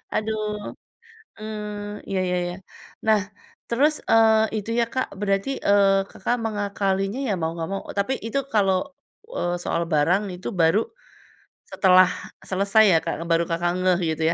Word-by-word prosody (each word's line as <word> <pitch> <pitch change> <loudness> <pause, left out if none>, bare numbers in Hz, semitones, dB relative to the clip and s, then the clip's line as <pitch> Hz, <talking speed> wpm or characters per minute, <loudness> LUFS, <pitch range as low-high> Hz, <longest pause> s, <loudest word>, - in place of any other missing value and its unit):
Aduh. 215 -1 -3 0.7
Eee, 210 -1 -6
iya 195 - -1
iya 180 0 0
iya. 175 0 -4 0.5
Nah 215 -1 +4 0.5
terus, 280 +6 +3 0.2
eee, 220 -1 +4
itu 210 +2 -6
ya 235 - +4
Kak 260 - 0
berarti, 200 +3 0 0.2
eee, 195 -1 +4
Kakak 240 +5 -1
mengakalinya 200 0 -1
ya - - +1
mau 160 - 0
nggak 165 -1 -4
mau 195 - -3 0.2
tapi 200 +7 +1
itu 230 +5 -1 0.2
kalau, 195 -3 +3 0.6
eee, 175 0 -1
soal 170 - -1
barang 165 +7 +3
itu 180 - -6
baru 165 +5 +4 0.9
setelah 185 -1 +6 0.4
selesai 200 +3 +3
ya - - +6
Kak, - - -1 0.2
baru 165 0 +3
Kakak 170 +1 0
ngeh 185 -1 +2
gitu 160 - -4
200 Hz, 145 wpm, -23 LUFS, 185-215 Hz, 0.9 s, setelah